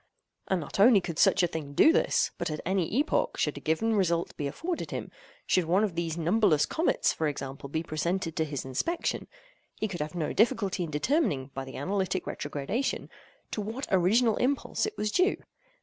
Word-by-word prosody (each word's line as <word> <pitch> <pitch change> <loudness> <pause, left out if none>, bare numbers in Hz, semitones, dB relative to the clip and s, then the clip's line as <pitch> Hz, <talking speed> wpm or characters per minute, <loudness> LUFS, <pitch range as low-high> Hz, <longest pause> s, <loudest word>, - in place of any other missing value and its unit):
And 190 - +1
not 165 - -6
only 215 +1 +7
could 170 -3 -5
such 195 -2 +5
a - - +4
thing 155 -4 -6
do 315 - +6
this, - - +2
but - - -1
at 155 -1 -3
any 185 -2 0
epoch, 295 +2 +1
should - - 0
a - - -6
given 190 +9 0
result 175 -5 +1
be 145 - -2
afforded 330 - -4
him—should - - -3
one 185 +6 +3
of 205 -5 0
these 165 -1 -2
numberless 170 -2 +3
comets, 325 +2 +1
for 160 - -1
example, 140 -1 -5
be 160 +3 -2
presented 165 +2 -2
to 160 - +1
his 145 -4 -4
inspection—he 340 - -4
could 180 -5 -5
have 150 +3 -4
no 160 -3 -2
difficulty 215 -5 +2
in - - -7
determining, 150 - 0
by 135 0 -5
the 130 - -8
analytic 190 +4 -1
retrogradation, 150 - -3 0.4
to 215 - -2
what 225 +6 -4
original 210 +5 +3
impulse 280 +10 0
it 430 - -7
was 210 - -1
due. 370 - +2
185 Hz, 185 wpm, -28 LUFS, 155-225 Hz, 0.4 s, only